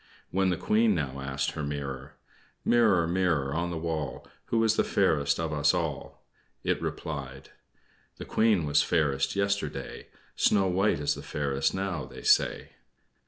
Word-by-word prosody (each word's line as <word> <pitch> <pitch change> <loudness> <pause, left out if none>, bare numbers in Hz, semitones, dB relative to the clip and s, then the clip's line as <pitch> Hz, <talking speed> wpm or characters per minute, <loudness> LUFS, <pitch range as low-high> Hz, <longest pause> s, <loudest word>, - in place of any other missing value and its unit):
When 95 0 +2
the 90 - 0
Queen 110 +2 +2
now 70 -4 -3
asked 70 0 -2
her - - -5
mirror: 70 -1 -5 0.5
"Mirror, 110 -8 +4
mirror 85 -6 0
on 85 +2 -1
the 85 - -4
wall, 80 -4 -4 0.2
Who 115 -1 +1
is 110 -1 +3
the - - +3
fairest 70 -1 +1
of 80 -1 -2
us 75 -1 +3
all?" - - -4 0.4
it - - 0
replied: 70 -3 -6 0.7
"The - - -7
Queen 110 -7 +2
was 75 0 +3
fairest 70 -2 +1
yesterday; 100 0 -2 0.3
Snow 100 -2 +3
White 95 -1 +2
is 75 - +1
the - - -8
fairest, 70 0 -1
now, 95 -3 -2
they - - -11
say." - - +2
80 Hz, 155 wpm, -28 LUFS, 70-95 Hz, 0.7 s, Mirror